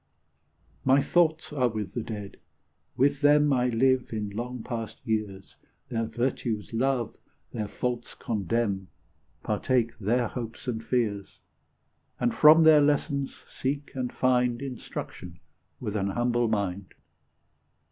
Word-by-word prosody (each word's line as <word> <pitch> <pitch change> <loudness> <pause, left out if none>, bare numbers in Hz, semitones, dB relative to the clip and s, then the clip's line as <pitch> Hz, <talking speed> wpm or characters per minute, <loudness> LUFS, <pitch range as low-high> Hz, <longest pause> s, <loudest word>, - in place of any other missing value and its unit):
My 135 +1 +5
thoughts 160 0 +2
are 130 -4 +2
with 110 -3 -5
the 120 - -2
Dead; 105 -3 -7 0.6
with 140 +2 +2
them 145 0 +5
I 125 -1 +2
live 130 +2 +2
in 105 -2 -3
long 120 +3 -5
past 115 -3 -5
years, 105 -4 -3 0.3
Their 115 -2 -1
virtues 120 -3 -2
love, 125 0 0 0.4
their 105 -2 -3
faults 120 +2 -3
condemn, 105 -3 -1 0.6
Partake 120 -3 0
their 120 +4 +1
hopes 115 +1 -7
and 115 -2 -2
fears, 110 -5 -1 0.8
And 120 -1 +1
from 155 +2 +7
their 155 -2 +7
lessons 145 -1 0
seek 140 +2 -3
and 125 -2 -3
find 125 -2 +2
Instruction 110 -9 -7 0.4
with 105 -4 -4
an 100 -2 0
humble 120 +3 +1
mind. 100 -3 -2
120 Hz, 125 wpm, -27 LUFS, 110-130 Hz, 0.8 s, from